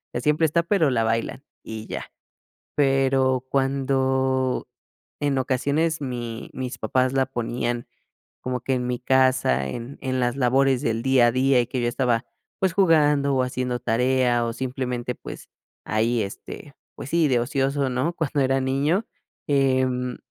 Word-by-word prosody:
Siempre 150 +6 +2
está, 170 +2 +2
pero 170 -4 +2
la 115 -3 +1
bailan 115 +4 -1 0.2
y 110 0 -7
ya. - - -6 0.7
Pero 135 -2 +2
cuando 130 -1 0 0.5
en 145 -2 +1
ocasiones 140 +5 0
mi 120 -4 -5
mis 130 -1 -5
papás 130 +3 +1
la 135 -1 +2
ponían 120 -1 -3 0.5
como 125 0 -3
que 130 +2 -1
en 125 -1 -2
mi 125 0 -2
casa, 130 - +2
en 120 - -7
en 130 -1 -1
las 120 +1 0
labores 135 0 +2
del 115 -4 -1
día 130 -2 +4
a - - +1
día, 130 0 +3
y 120 - -1
que 130 +1 -3
yo 120 - +1
estaba, 120 -1 0 0.4
pues, 190 -3 +1
jugando 150 -7 +3
o 130 - +2
haciendo 125 -1 -2
tarea, 125 0 +2
o 115 - -2
simplemente, 125 0 -3
pues, - - -10 0.4
ahí, 110 +2 +1
este, 100 -1 -8 0.2
pues 135 - -8
sí, 165 -2 +3
de 125 -3 +2
ocioso, 135 +2 0
¿no? 130 +8 -1
Cuando 150 -3 -1
era 135 0 +2
niño, 140 +10 +1 0.4
em 130 -3 +1
130 Hz, 155 wpm, -24 LUFS, 125-135 Hz, 0.7 s, día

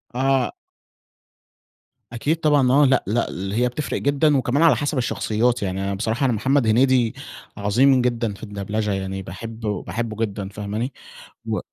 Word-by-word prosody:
آه. 135 +1 +1 1.6
أكيد 145 +7 0
طبعًا. 145 -5 +3
آه، 145 +2 +5
لأ، 130 -1 +3
لأ، 115 +3 0
ل 95 +2 -5
هي 125 +3 +2
بتفرْق 140 +4 -3
جدًا، 145 +1 +3
وكمان 130 +4 +1
على 160 -6 +6
حسب 145 +4 -2
الشخصيات 120 -1 0
يعني 95 0 -2
أنا 100 0 -2
بصراحة 110 +6 -1
أنا 125 - +2
محمد 130 +3 +1
هنيدي 125 +1 +3 0.4
عظيم 125 +6 +3
جدًا 120 -3 -1
في 100 - -14
الدبلچة، 105 +1 -3
يعني 95 0 -3
باحب 110 +5 -8
باحبه 110 +2 -3
جدًا 100 -2 -6
فاهماني؟ 105 +5 -4 0.5
و - - -1
115 Hz, 155 wpm, -22 LUFS, 105-130 Hz, 1.6 s, على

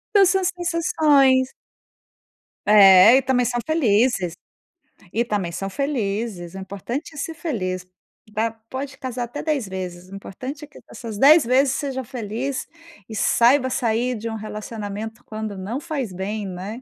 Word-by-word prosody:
Então 400 -1 +7
são 380 +1 +2
essas 375 +1 0 0.2
sensações. 280 -6 +3 1.1
É, 205 +2 +8
e 270 - +3
também 250 -1 +1
são 240 +1 -1
felizes. 230 - +2 0.8
E 235 +2 +2
também 205 -6 -2
são 195 +3 -4
felizes. 210 - -3
O - - -8
importante 200 - -6
é - - -11
ser 325 +3 -4
feliz, 185 - -3 0.5
tá, 225 +2 0 0.2
pode 265 +1 -5
casar 255 -1 -4
até 240 +5 -6
10 295 -8 -1
vezes. 185 -1 -6
O - - -8
importante 260 +9 -7
é - - -22
que 290 - -15
essas 225 -4 -7
10 295 +5 +7
vezes 260 +2 +3
seja 270 -2 -3
feliz, 240 +3 -4 0.4
e 220 - -8
saiba 255 +5 +4
sair 245 0 0
de 225 +1 -5
um 225 - -4
relacionamento 215 +1 -6
quando 215 -2 -5
não 205 +8 -4
faz 290 - -4
bem, 205 +3 -4
né. 195 +6 -6
235 Hz, 155 wpm, -22 LUFS, 200-270 Hz, 1.1 s, É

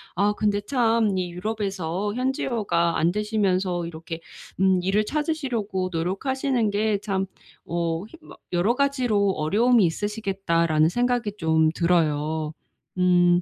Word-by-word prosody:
아 200 +3 +2
근데 205 -1 0
참 225 -3 +1
이 180 -1 -2
유럽에서 195 -1 -3
현지어가 225 -9 0
안 165 +2 +2
되시면서 190 -4 0
이렇게 165 0 -7 0.4
음 190 -1 +4
일을 200 +3 +1
찾으시려고 245 - -2
노력하시는 230 +8 0
게 210 +1 +1
참 195 -2 -1 0.4
어 170 0 -2
힘 330 - -15
막 - - -13
'여러 185 +7 +2
가지로 250 -8 +1
어려움이 215 +8 +3
있으시겠다.'라는 170 -4 +1
생각이 240 0 0
좀 160 -2 +2
들어요. 155 -2 +1 0.4
음. 175 -1 +4
195 Hz, 280 characters per minute, -24 LUFS, 170-220 Hz, 0.4 s, 음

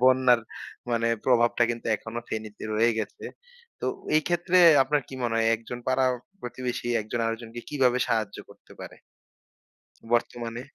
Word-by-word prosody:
বন্যার 130 -2 +5 0.5
মানে 115 0 +1 0.2
প্রভাবটা 120 -1 +3
কিন্তু 115 0 -5
এখনো 115 +3 -7
ফেনীতে 110 -1 -6
রয়ে 115 +2 +3
গেছে। 105 - -5 0.6
তো - - -2 0.3
এই 155 - +3
ক্ষেত্রে 175 +1 +2 0.2
আপনার 150 +2 +1
কি 135 - -8
মনে 120 -1 0
হয়, 115 0 +2
একজন 115 +2 -8
পাড়া 130 0 +2 0.4
প্রতিবেশী 125 0 -4
একজন 110 +3 -4
আরেকজনকে 115 +1 -5
কিভাবে 130 -4 +2
সাহায্য 110 -3 -1
করতে - - -18
পারে? - - -9 1.1
বর্তমানে? 120 0 -1
120 Hz, 140 wpm, -26 LUFS, 115-130 Hz, 1.1 s, বন্যার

